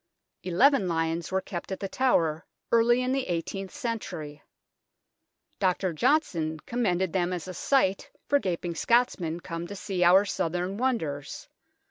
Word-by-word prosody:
Eleven 190 +5 +3
lions 165 0 -1
were 190 0 +1
kept 180 -1 -6
at 190 - -3
The 195 - -3
Tower 170 -10 +1 0.3
early 240 +2 +4
in 255 - 0
the 270 0 -1
eighteenth 185 +3 -3
century. 185 - -5 1.2
Dr. 185 -1 +1
Johnson 160 - +1
commended 190 -7 -1
them 180 -1 +1
as 180 -1 -4
a 185 - -5
sight 195 -2 +1 0.2
for 285 - +3
gaping 175 -5 -2
Scots 235 +9 +2
men 165 -1 -3
come 170 0 -6
to 200 - -7
see 185 -1 -1
our 185 +3 +6
southron 180 +1 -2
wonders. 165 - -2
185 Hz, 145 wpm, -27 LUFS, 170-230 Hz, 1.2 s, our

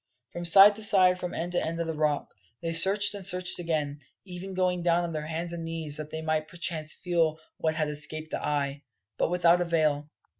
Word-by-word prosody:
From 175 0 -6
side 195 +4 +7
to 220 - -6
side, 185 -3 +3
from 180 -1 -6
end 175 +2 -4
to 175 - -1
end 165 +1 -4
of 170 - -2
the 160 - -4
Rock, 150 -1 -2 0.3
they 165 0 -4
searched 195 +5 +7
and 200 -1 -8
searched 180 -1 +2
again, 150 -4 -3 0.3
even 185 +1 -8
going 180 -1 0
down 170 0 +1
on 170 -1 -5
their 155 -1 -5
hands 165 +2 -5
and 170 -1 -6
knees 165 -3 -2
that 155 -1 -7
they 160 +1 -7
might 155 -1 -2
perchance 160 -1 -3
feel 165 -3 -1 0.2
what 160 -1 -1
had 155 -1 -1
escaped 155 +1 -3
the - - -4
eye, 140 -1 -2 0.4
But - - +1
without 175 0 +3
avail. 155 -4 0
165 Hz, 215 wpm, -27 LUFS, 155-180 Hz, 0.4 s, side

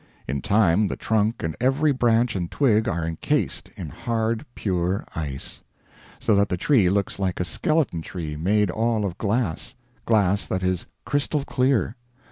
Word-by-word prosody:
In 70 -1 -2
time 100 - +3
the - - -3
trunk 110 +1 0
and 80 -1 -2
every 135 +4 +3
branch 120 -3 +2
and 90 -3 -2
twig 110 -6 +2
are 85 -1 -1
incased 80 0 -1
in - - -5
hard 115 +3 -2
pure 95 -1 -1
ice; 70 -5 -5 0.6
so 110 - +2
that 100 0 +3
the 90 - -1
tree 105 -3 +3
looks 100 +1 -1
like 95 -2 -1
a 90 - 0
skeleton 155 - 0
tree 80 -3 -5
made 100 +5 +2
all 110 0 0
of 95 0 -4
glass 110 -5 -1 0.3
glass 100 -5 +2
that 95 0 -2
is 90 -1 -1 0.2
crystal 145 0 0
clear. 130 -3 +1
105 Hz, 160 wpm, -24 LUFS, 90-115 Hz, 0.6 s, time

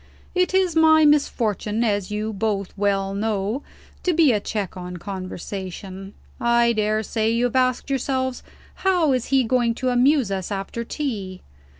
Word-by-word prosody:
"It 365 0 +1
is 370 -3 +2
my 315 -1 +6
misfortune, 230 -7 +1
as 205 -4 0
you 210 +1 -3
both 200 -2 -2
well 195 -1 0
know, 210 +4 -1 0.4
to 360 - +1
be 315 -5 +5
a 215 - +2
check 205 -2 -4
on 180 -1 -7
conversation. 190 +1 -7 0.2
I 235 0 +3
dare 215 0 0
say 220 +1 0
you 230 +2 +1
have 245 - -2
asked 255 +1 +1
yourselves: 260 -1 -1 0.4
How 360 -6 +2
is 255 -2 0
he 270 -1 +3
going 235 -1 +1
to 255 +1 -1
amuse 250 -2 +3
us, 190 0 -3
after 200 +4 -4
tea? 210 -9 -4
225 Hz, 160 wpm, -23 LUFS, 200-260 Hz, 0.4 s, my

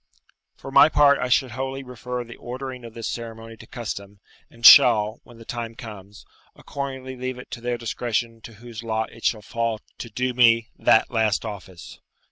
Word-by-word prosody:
For 135 - -10
my 150 - +7
part, 145 -2 +5
I 125 - -2
should 125 0 +2
wholly 135 +2 -4
refer 125 0 -6
the 120 0 -11
ordering 130 0 -7
of 115 -1 -11
this 115 -1 -5
ceremony 115 -1 -7
to - - -14
custom, 100 -4 -7 0.3
and 115 0 -7
shall, 110 -3 +8
when 120 - -16
the 115 - -13
time 115 -1 -5
comes, 105 -3 -11 0.3
accordingly 130 -2 -6
leave 130 0 -5
it 125 - -12
to 120 - -7
their 120 0 -2
discretion 115 0 -3
to 115 - -11
whose 115 +1 -10
lot 110 -1 -2
it 115 - -11
shall 110 -2 +1
fall 115 0 -2 0.2
to 115 - -6
do 125 +3 -2
me 115 -1 +4
that 110 - +3
last 110 -4 +1
office. 95 -4 -9
115 Hz, 185 wpm, -23 LUFS, 110-125 Hz, 0.3 s, shall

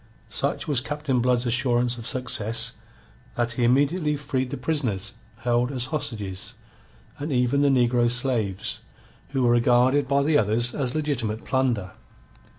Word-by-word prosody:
Such - - -1
was 140 -5 +2
Captain 145 -2 -1
Blood's 125 0 +1
assurance 120 0 +1
of 115 - -6
success 120 -3 +2 0.6
that 120 -1 0
he 120 +1 -1
immediately 145 +6 +2
freed 140 -3 -2
the - - -4
prisoners 125 -8 -1 0.3
held 120 +1 +1
as 125 -3 -1
hostages, 105 -10 -4 0.6
and 145 +2 -4
even 125 +2 +2
the 145 - +4
negro 120 -2 +3
slaves, 120 -6 -1 0.5
who 135 -2 -1
were 120 - +4
regarded 125 +4 +3
by 140 +1 +2
the 150 0 +3
others 115 +3 +1
as 130 -2 -2
legitimate 125 -8 -2
plunder. 125 -8 0
125 Hz, 145 wpm, -24 LUFS, 120-140 Hz, 0.6 s, the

